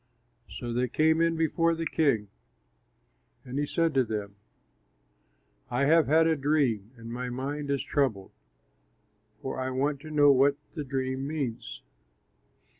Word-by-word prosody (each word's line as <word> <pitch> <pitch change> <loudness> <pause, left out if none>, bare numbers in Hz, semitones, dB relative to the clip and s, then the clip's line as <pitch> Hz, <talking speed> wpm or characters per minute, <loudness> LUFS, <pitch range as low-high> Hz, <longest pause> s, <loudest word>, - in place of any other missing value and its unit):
So 120 -1 -5
they 125 +1 +1
came 160 +5 +2
in 165 0 +2
before 165 +1 +1
the 165 0 -4
king, 125 -12 +1 1.2
and 130 +2 -4
he 145 - -1
said 165 0 +1
to 135 -1 +3
them, 105 -3 -5 1.3
"I 125 +3 +1
have 160 +1 +4
had 160 +3 +4
a 160 0 +3
dream 135 -8 0
and 115 0 -8
my 125 +1 -4
mind 140 +4 -4
is 140 -1 0
troubled, 115 -10 -1 1.1
for 130 - -4
I 130 0 -2
want 140 +2 -1
to 155 - -10
know 145 -2 +5
what 140 +1 +4 0.2
the 155 - -4
dream 130 0 -3
means." 125 - -4
140 Hz, 145 wpm, -28 LUFS, 125-155 Hz, 1.3 s, know